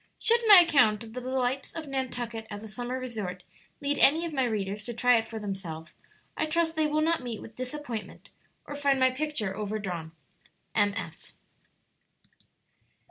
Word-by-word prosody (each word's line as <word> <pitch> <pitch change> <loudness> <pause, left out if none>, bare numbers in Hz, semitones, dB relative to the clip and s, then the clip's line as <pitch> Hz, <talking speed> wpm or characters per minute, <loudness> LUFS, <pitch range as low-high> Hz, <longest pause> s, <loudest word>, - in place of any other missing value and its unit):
Should 465 +1 +4
my 405 -4 +11
account 240 -10 +4
of 220 -1 -11
the 250 - -5
delights 255 +1 -1
of 320 -2 -6
Nantucket 245 -4 -4
as 205 0 -7
a - - -7
summer 245 +4 -4
resort 210 -8 -5 0.4
lead 285 0 -1
any 320 +5 +5
of 330 - -5
my 265 -3 +2
readers 210 -2 -2
to 240 - -5
try 245 +1 +5
it 225 - -1
for 225 0 -7
themselves, 190 -6 -6 0.4
I - - 0
trust 325 +1 +1
they 315 -1 +2
will 305 +1 +1
not 325 0 +2
meet 235 -4 -5
with 225 - -11
disappointment 250 -4 -6 0.4
or 290 - -7
find 280 -2 +2
my 260 0 +4
picture 255 -8 -2
overdrawn. 195 -6 -4 0.6
M. 205 -1 +2
245 Hz, 165 wpm, -28 LUFS, 210-290 Hz, 0.6 s, my